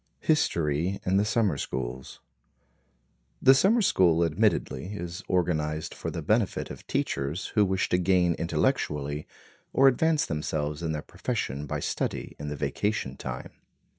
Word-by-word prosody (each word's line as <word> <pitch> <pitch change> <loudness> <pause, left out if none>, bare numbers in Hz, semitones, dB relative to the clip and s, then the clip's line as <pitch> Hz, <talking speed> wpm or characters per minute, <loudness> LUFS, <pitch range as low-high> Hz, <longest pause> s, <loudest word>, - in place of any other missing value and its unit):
History 85 - +1
in 95 +1 +2
the 100 - +3
Summer 105 -8 +1
Schools 65 0 -5 1.2
The 135 - +7
summer 205 - +4
school 85 - +4
admittedly 85 +4 0
is 85 -2 -5
organized 80 -4 0
for - - -5
the - - -5
benefit - - 0
of - - -11
teachers 70 +6 -2
who 105 - +5
wish 95 -1 +1
to 90 - +2
gain 90 -1 +3
intellectually, 75 - -1 0.4
or 135 - +5
advance 155 +4 +3
themselves 75 0 -2
in 80 -2 -1
their 75 -1 -3
profession 70 +3 -3
by - - -3
study - - -3
in 75 - -5
the 75 - -3
vacation 100 +10 -2
time. - - -6
85 Hz, 140 wpm, -27 LUFS, 75-100 Hz, 1.2 s, The